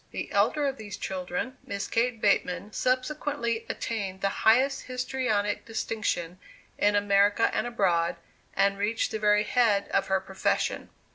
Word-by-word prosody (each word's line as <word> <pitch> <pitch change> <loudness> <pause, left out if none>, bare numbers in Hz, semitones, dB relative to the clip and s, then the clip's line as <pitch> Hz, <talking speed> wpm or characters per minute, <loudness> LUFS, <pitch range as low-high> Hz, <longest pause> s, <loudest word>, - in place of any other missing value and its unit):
The - - -5
elder 295 -2 +2
of 275 -1 -1
these 205 -3 -7
children, 190 +7 -4
Miss 200 -1 -4
Kate 230 0 0
Bateman, 200 -1 +1
subsequently 255 -2 -1
attained 195 -4 -4
the 195 0 -1
highest 270 +4 +3
histrionic 250 -5 -1
distinction 205 -6 -3 0.4
in 205 0 +3
America 205 0 +3
and 230 - 0
abroad, 175 -8 +1 0.4
and 200 0 +2
reached 220 +4 0
the 220 - -3
very 210 0 +4
head 220 -4 +2
of - - +1
her 190 0 +2
profession. 190 0 -1
210 Hz, 140 wpm, -27 LUFS, 195-240 Hz, 0.4 s, very